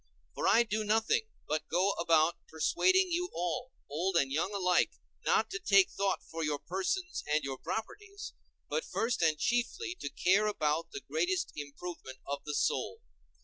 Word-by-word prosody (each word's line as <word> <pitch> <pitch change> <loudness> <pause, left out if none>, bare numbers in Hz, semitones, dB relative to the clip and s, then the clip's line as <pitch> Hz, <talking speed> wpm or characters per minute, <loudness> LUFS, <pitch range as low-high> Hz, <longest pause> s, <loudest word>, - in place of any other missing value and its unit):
For - - -1
I 235 - +6
do 215 -1 -1
nothing 225 - +2 0.2
but 155 +1 -2
go 185 +4 +3
about 165 -2 +2
persuading 370 - +3
you 355 +1 0
all, 210 +10 -2 0.2
old 170 +5 0
and 135 -4 +2
young 160 +7 0
alike, 180 -3 +2 0.3
not 220 0 +2
to 195 - -3
take 195 -1 +5
thought 195 -1 -1
for 165 0 -5
your 150 -1 0
persons 270 - -2
and 150 0 +2
your 135 -1 -4
properties, 400 - -5 0.3
but 475 - -1
first 230 -4 -1
and 160 -2 +3
chiefly 245 - 0
to - - -4
care 195 +4 +3
about 155 -5 0
the 405 - -7
greatest 375 -4 -1
improvement 145 -1 -7
of 140 0 -4
the 150 -1 -3
soul. 460 - 0
195 Hz, 165 wpm, -32 LUFS, 160-255 Hz, 0.3 s, I